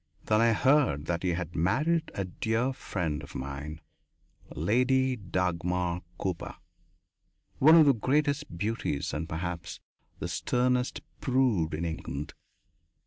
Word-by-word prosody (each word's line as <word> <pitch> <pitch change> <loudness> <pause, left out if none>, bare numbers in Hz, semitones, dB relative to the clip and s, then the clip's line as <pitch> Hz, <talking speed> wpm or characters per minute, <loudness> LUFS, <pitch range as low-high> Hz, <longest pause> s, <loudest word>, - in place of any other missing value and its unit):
Then 110 0 +3
I 115 0 +5
heard 130 - +3
that 85 0 -1
he 90 -2 +1
had 85 -1 -4
married 150 - +1
a 100 - -1
dear 115 +7 -1
friend 80 -11 -3
of 70 - -11
mine 70 +4 -5 0.7
Lady 130 - +2
Dagmar 90 -3 -1 0.2
Cooper, 90 -3 -3 1.0
one 155 +4 +8
of 160 -2 +8
the 140 - +6
greatest 145 - 0
beauties 100 -7 -2
and 80 +3 -3
perhaps 85 0 -4 0.4
the - - -4
sternest 125 0 0 0.2
prude 125 - +1
in 85 +2 -3
England. 75 -3 -5
95 Hz, 125 wpm, -29 LUFS, 85-130 Hz, 1.0 s, one